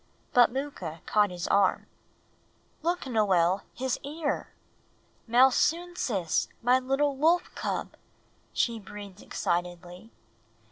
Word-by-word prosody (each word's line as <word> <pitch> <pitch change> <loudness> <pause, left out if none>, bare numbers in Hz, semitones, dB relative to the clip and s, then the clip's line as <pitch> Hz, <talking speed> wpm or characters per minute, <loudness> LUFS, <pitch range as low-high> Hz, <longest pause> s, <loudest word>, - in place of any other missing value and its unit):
But 245 -1 +6
Mooka 235 - -5
caught 210 -1 +3
his 180 -1 -5
arm 200 -1 +3 1.0
"Look, 345 +1 -1
Noel, 195 -6 +2
his 260 0 -2
ear! 295 +1 -3 0.8
Malsunsis, 255 - +2 0.2
my 250 +2 +5
little 270 +2 0
wolf 330 +6 +2
cub," - - -3 0.6
she 235 -2 0
breathed 200 -1 -10
excitedly. 175 +4 -3
235 Hz, 95 wpm, -28 LUFS, 185-275 Hz, 1.0 s, But